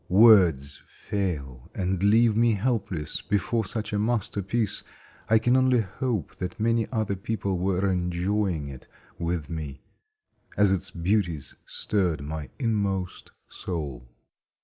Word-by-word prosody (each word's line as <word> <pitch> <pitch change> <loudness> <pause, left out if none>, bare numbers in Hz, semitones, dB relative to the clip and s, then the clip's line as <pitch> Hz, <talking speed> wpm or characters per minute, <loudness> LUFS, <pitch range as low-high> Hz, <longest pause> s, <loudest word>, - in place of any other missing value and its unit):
Words 90 - +5
fail, 75 - -4
and 95 -1 -1
leave 110 +2 +5
me 115 0 +4
helpless 100 -8 -1
before 110 +3 0
such 105 +2 -3
a 105 - +1
masterpiece 105 -1 -1 0.5
I 110 - +6
can 120 +3 +3
only 130 -2 +4
hope 105 - -3
that 95 +5 -5
many 115 0 +2
other 110 -4 0
people 100 -2 -2
were 95 +1 +1
enjoying 90 -2 0
it 65 -2 -10 0.3
with 85 -3 -2
me, 75 -4 -6 0.7
as 105 -2 +5
its 95 0 0
beauties 85 -4 -1
stirred 90 -8 0
my 75 0 -5
inmost 100 -6 -1 0.2
soul. 70 -9 -5
95 Hz, 125 wpm, -26 LUFS, 85-110 Hz, 0.7 s, I